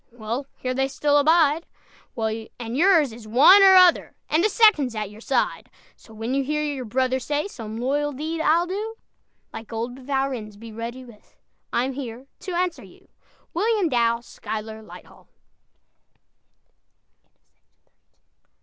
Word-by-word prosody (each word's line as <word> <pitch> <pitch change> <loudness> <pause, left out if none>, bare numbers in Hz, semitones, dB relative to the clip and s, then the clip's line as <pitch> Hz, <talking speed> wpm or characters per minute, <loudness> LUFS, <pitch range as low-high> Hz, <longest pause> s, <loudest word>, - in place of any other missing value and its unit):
Well, 235 +4 -5
here 255 0 -3
they 270 +1 0
still 290 +2 +1
abide; 315 +1 +3 0.5
And 225 +1 -4
yours 320 - +4
is 225 -1 -12
one 280 - +7
or 385 -1 +8
other, 365 -2 +5
And 315 +3 +2
the 430 - +3
second's 375 - +4
at 210 -2 -4
your 210 +1 -14
side; 255 0 -1 0.3
So 225 - -19
when 225 +3 -4
you 275 0 +1
hear 300 +2 -1
your 285 -4 -3
brother 255 +3 0
say, 290 +6 -2
"Some 225 - -8
loyal 285 +4 -1
deed 315 +4 -4
I'll 330 +2 +3
do," 420 +5 -5 0.6
Like 225 0 -9
old 235 +3 -4
Valrennes, 260 -6 -3
be 225 +1 -11
ready 235 +3 -7
with 230 -4 -18 0.4
"I'm 255 +3 0
here 255 -2 -7
to 370 - -7
answer 355 -1 -1
you!" - - -18 0.4
WILLIAM 415 0 +1
DOUW 235 -2 +1
SCHUYLER 220 -1 -7
LIGHTHALL. 215 - -15
265 Hz, 140 wpm, -23 LUFS, 230-310 Hz, 0.6 s, or